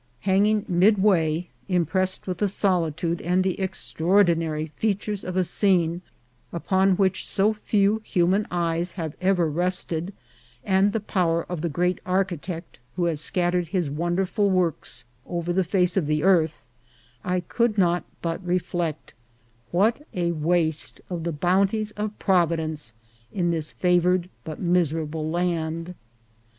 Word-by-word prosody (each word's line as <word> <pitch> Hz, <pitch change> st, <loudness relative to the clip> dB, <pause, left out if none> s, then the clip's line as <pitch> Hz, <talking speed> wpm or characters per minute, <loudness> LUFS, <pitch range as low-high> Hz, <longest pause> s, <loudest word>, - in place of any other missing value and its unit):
Hanging 200 Hz, +2 st, +2 dB
midway, 180 Hz, -3 st, +3 dB, 0.2 s
impressed 185 Hz, +1 st, 0 dB
with 180 Hz, -2 st, -4 dB
the 205 Hz, -, +2 dB
solitude 170 Hz, -4 st, 0 dB
and 180 Hz, +2 st, +1 dB
the 190 Hz, 0 st, -1 dB
extraordinary 170 Hz, -4 st, +1 dB
features 205 Hz, -1 st, -1 dB
of 185 Hz, 0 st, -4 dB
a 185 Hz, -, +4 dB
scene 175 Hz, -3 st, +2 dB, 0.5 s
upon 190 Hz, +2 st, +2 dB
which 190 Hz, 0 st, 0 dB
so 210 Hz, +2 st, +2 dB
few 210 Hz, 0 st, +1 dB
human 190 Hz, +1 st, +1 dB
eyes 170 Hz, 0 st, -1 dB
have 160 Hz, -5 st, -5 dB
ever 185 Hz, -3 st, +2 dB
rested, 175 Hz, +1 st, -1 dB, 0.5 s
and 195 Hz, +1 st, +3 dB
the 225 Hz, -, -2 dB
power 170 Hz, -5 st, 0 dB
of 175 Hz, -3 st, -5 dB
the 170 Hz, -, -1 dB
great 180 Hz, +4 st, 0 dB
Architect 180 Hz, -3 st, -3 dB, 0.2 s
who 175 Hz, -, 0 dB
has 160 Hz, -3 st, 0 dB
scattered 175 Hz, +1 st, 0 dB
his 170 Hz, -3 st, -1 dB
wonderful 180 Hz, +6 st, 0 dB
works 180 Hz, -9 st, -1 dB, 0.2 s
over 175 Hz, 0 st, -2 dB
the 190 Hz, -, +2 dB
whole 170 Hz, -, -5 dB
face 180 Hz, -3 st, +2 dB
of 180 Hz, -7 st, +1 dB
the 150 Hz, 0 st, 0 dB
earth, 170 Hz, -5 st, +4 dB, 0.7 s
I 180 Hz, 0 st, 0 dB
could 230 Hz, +4 st, 0 dB
not 175 Hz, -2 st, +2 dB, 0.2 s
but 165 Hz, +2 st, -2 dB
reflect, 175 Hz, -3 st, -2 dB, 0.6 s
what 215 Hz, +10 st, +2 dB
a 175 Hz, -1 st, 0 dB
waste 160 Hz, -1 st, 0 dB
of 170 Hz, -2 st, -3 dB
the 170 Hz, -, 0 dB
bounties 195 Hz, +7 st, +1 dB
of 210 Hz, 0 st, -4 dB
Providence 160 Hz, -, 0 dB, 0.4 s
in 175 Hz, -3 st, 0 dB
this 160 Hz, -2 st, -2 dB
favoured 180 Hz, 0 st, +2 dB
but 155 Hz, -1 st, -7 dB
miserable 160 Hz, -3 st, 0 dB
land 165 Hz, 0 st, -2 dB
180 Hz, 140 wpm, -24 LUFS, 165-190 Hz, 0.7 s, a